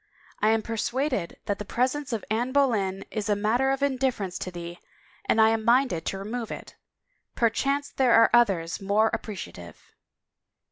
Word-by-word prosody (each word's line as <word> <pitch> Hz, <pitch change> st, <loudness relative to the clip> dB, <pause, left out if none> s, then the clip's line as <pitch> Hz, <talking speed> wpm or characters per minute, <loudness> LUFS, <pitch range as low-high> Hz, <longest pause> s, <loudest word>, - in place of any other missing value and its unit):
I 215 Hz, -, +4 dB
am 220 Hz, 0 st, +2 dB
persuaded 235 Hz, -, -2 dB
that 205 Hz, -, -2 dB
the -, -, -3 dB
pres 250 Hz, +5 st, 0 dB
ence 290 Hz, -2 st, -6 dB
of 225 Hz, -3 st, -3 dB
Anne 240 Hz, +4 st, 0 dB
Boleyn 210 Hz, -9 st, +1 dB
is 215 Hz, -1 st, -3 dB
a 205 Hz, -, +3 dB
matter 225 Hz, +6 st, +1 dB
of 270 Hz, +1 st, 0 dB
indifference 255 Hz, -9 st, -1 dB
to -, -, -4 dB
thee 175 Hz, -1 st, -8 dB, 0.5 s
and 310 Hz, -, +2 dB
I 220 Hz, 0 st, +7 dB
am 225 Hz, -1 st, -1 dB
minded 235 Hz, -7 st, +2 dB
to 195 Hz, -, -2 dB
remove 220 Hz, +4 st, -5 dB
it. -, -, -8 dB, 0.6 s
Perchance 275 Hz, +5 st, +1 dB
there 255 Hz, -3 st, +3 dB
are 230 Hz, 0 st, +6 dB
others 195 Hz, -9 st, +2 dB
more 205 Hz, +3 st, +2 dB
appreciative." 180 Hz, -, -7 dB
225 Hz, 170 wpm, -26 LUFS, 200-255 Hz, 0.6 s, I